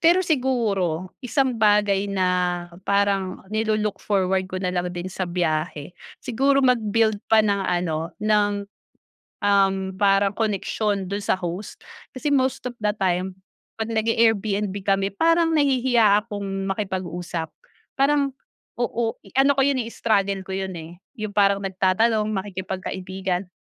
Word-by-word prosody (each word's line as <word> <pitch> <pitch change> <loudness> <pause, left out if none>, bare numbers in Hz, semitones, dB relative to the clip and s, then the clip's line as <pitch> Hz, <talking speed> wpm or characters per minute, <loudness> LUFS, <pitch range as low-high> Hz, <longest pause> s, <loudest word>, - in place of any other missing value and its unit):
pero 350 +3 +4
siguro, 210 - 0
isang 255 -2 0
bagay 205 -1 +3
na, 190 -2 0 0.6
parang 200 -2 +1
nilo-look 215 -1 0
forward 190 -2 0
ko 185 - -5
na 185 -1 -2
lang 180 0 -1
din 175 0 -6
sa 185 -2 -3
biyahe, 155 -2 -2 0.2
siguro 275 +3 +1
mag-build 220 -3 +2
pa 220 -1 +5
ng 200 -1 +1
ano 175 -3 -1
ng, 205 -1 +2 0.8
um, 200 -1 +3 0.2
parang 195 0 +3
koneksyon 205 -2 -1
do'n 200 0 -3
sa - - +2
host. 180 +2 -5 0.3
Kasi, 285 +3 -2
most 265 -2 +1
of 245 - -13
the 210 -1 0
time, 185 -2 -1 0.5
'pag 220 - -2
nag-i-Airbnb 220 -3 +1
kami, 195 0 +2
parang 330 - +2
nahihiya 245 -7 +4
akong 195 -3 -4
makipag-usap. 180 -4 -3 0.5
Parang 275 -1 +2 0.4
oo, 235 -1 -1 0.2
ano 275 +1 +5
ko 270 - +2
'yon 275 -2 +2
eh, 225 - -5
struggle 200 -4 0
ko 190 - -8
yun 190 -1 -3
eh. 165 +2 -10 0.2
Yung 215 -1 -4
parang 200 -1 +4
nagtatanong 195 +4 +1
makikipagkaibigan 190 -1 -4
200 Hz, 130 wpm, -23 LUFS, 190-225 Hz, 0.8 s, pa